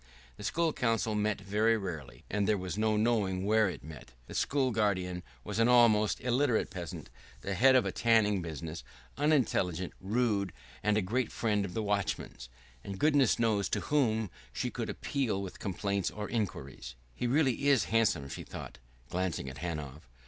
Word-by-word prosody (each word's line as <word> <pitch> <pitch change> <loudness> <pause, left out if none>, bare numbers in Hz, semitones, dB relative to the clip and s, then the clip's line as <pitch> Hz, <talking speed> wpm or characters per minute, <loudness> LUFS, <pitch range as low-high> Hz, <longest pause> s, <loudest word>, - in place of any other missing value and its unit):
The - - -9
School 165 -2 +1
Council 115 -2 0
met 105 -1 0
very 105 +3 +2
rarely, 75 - -6
and 100 -1 0
there 105 - +3
was 90 -2 -4
no 110 0 +1
knowing 105 -4 +1
where 110 -1 +4
it 90 - -7
met; 75 -4 -11
the - - -10
school 135 -2 +1
guardian 95 -5 0 0.2
was - - -4
an 115 - +5
almost 115 -4 +5
illiterate 125 -1 +1
peasant, 85 -8 -7 0.3
the 100 - -3
head 130 +7 +5
of 130 - +4
a - - -1
tanning 110 -4 +3
business, 80 0 -6 0.3
unintelligent, 110 - +1
rude, 100 -2 0 0.3
and 105 +1 +2
a 105 - +1
great 120 +5 -1
friend 105 -3 0
of 90 - -7
the 110 - -1
watchman's 100 -11 -2 0.3
and 100 -1 -6
goodness 145 -3 +4
knows 110 -4 +1
to - - 0
whom 110 -9 +2 0.2
she - - -3
could - - -4
appeal 130 -8 -1
with 95 -2 -6
complaints 100 0 -1
or 105 -1 -5
inquiries.... 70 - -4 0.2
"He 120 - -2
really 135 0 +2
is 140 -5 +5
handsome," 100 -11 +2
she - - -6
thought, 60 - -9 0.3
glancing 90 -7 -2
at 65 - -11
Hanov. 75 -5 -5
105 Hz, 170 wpm, -31 LUFS, 90-115 Hz, 0.3 s, an